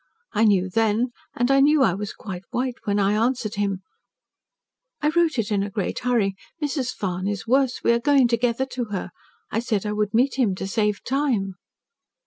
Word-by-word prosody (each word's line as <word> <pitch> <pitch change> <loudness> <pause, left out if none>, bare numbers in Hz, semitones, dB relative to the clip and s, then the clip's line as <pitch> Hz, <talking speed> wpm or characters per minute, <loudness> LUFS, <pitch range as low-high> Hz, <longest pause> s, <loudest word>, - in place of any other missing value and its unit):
I 220 +1 +3
knew 190 -3 +3
then, 225 +4 +1 0.2
and 245 +2 +1
I 275 - +5
knew 290 0 +5
I 190 - +3
was 205 +2 -4
quite 190 -6 -7
white 255 +1 -1
when 205 -1 +1
I 200 0 +2
answered 225 0 0
him: 200 -2 -2 1.2
"'I 300 - +3
wrote 330 -2 +2
it 220 -2 -1
in 200 -1 +2
a 200 - -2
great 200 -1 -3
hurry, 235 -6 +1 0.3
Mrs. 280 -4 -1
Farne 185 -1 -3
is 205 -1 -4
worse. 260 +1 +1
We - - +4
are 235 - +3
going 275 0 +4
together 235 +2 +1
to 255 -2 -4
her. 195 -4 -5 0.4
I 225 - 0
said 220 -3 -1
I 210 - -1
would 210 0 -1
meet 260 +3 +2
him 210 -7 +2
to 190 - -5
save 210 +1 0
time.' 250 -8 0
225 Hz, 195 wpm, -24 LUFS, 200-255 Hz, 1.2 s, I